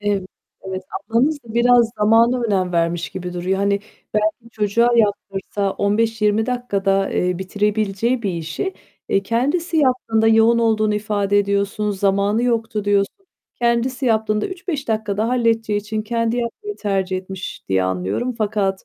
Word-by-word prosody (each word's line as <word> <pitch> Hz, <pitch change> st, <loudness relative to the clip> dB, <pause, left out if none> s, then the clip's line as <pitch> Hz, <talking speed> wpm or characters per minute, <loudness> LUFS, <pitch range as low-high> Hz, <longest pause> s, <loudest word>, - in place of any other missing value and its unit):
Ev 205 Hz, -2 st, 0 dB, 0.4 s
evet. 190 Hz, 0 st, -5 dB, 0.3 s
Ablanız 265 Hz, +7 st, +3 dB
da 225 Hz, -1 st, -10 dB
biraz 235 Hz, -1 st, +4 dB
zamana 230 Hz, +4 st, +4 dB
önem 190 Hz, -5 st, 0 dB
vermiş 170 Hz, 0 st, 0 dB
gibi 180 Hz, -1 st, -6 dB
duruyor. 180 Hz, +2 st, -1 dB
Hani, 200 Hz, 0 st, +1 dB, 0.3 s
belki 215 Hz, +2 st, -1 dB
çocuğa 220 Hz, +3 st, +2 dB
yaptırsa 200 Hz, -2 st, 0 dB
15-20 215 Hz, +1 st, +1 dB
dakikada, 200 Hz, -6 st, 0 dB
eee, 180 Hz, -1 st, 0 dB
bitirebileceği 210 Hz, +4 st, 0 dB
bir 200 Hz, -, 0 dB
işi, 165 Hz, -, -4 dB, 0.3 s
eee, 195 Hz, -, +2 dB
kendisi 290 Hz, -, 0 dB
yaptığında 250 Hz, -6 st, +2 dB
-yoğun 225 Hz, +1 st, +5 dB
olduğunu 215 Hz, -2 st, +2 dB
ifade 205 Hz, -1 st, +1 dB
ediyorsun, 200 Hz, +1 st, 0 dB
zamanı 200 Hz, +3 st, +1 dB
yoktu 225 Hz, -3 st, -1 dB
diyorsun 200 Hz, -1 st, +1 dB, 0.4 s
kendisi 240 Hz, +2 st, 0 dB
yaptığında 220 Hz, -2 st, +1 dB
3-5 355 Hz, -8 st, -5 dB
dakikada 215 Hz, 0 st, -1 dB
halledeceği 225 Hz, -4 st, +1 dB
için 215 Hz, +1 st, -4 dB
kendi 230 Hz, +1 st, -1 dB
yapmayı 405 Hz, -, -4 dB
tercih 195 Hz, -2 st, -1 dB
etmiş 185 Hz, 0 st, -7 dB
diye 95 Hz, -1 st, +2 dB
anlıyorum. 95 Hz, -, -1 dB
Fakat, 205 Hz, -3 st, -1 dB
215 Hz, 135 wpm, -20 LUFS, 195-235 Hz, 0.4 s, yoğun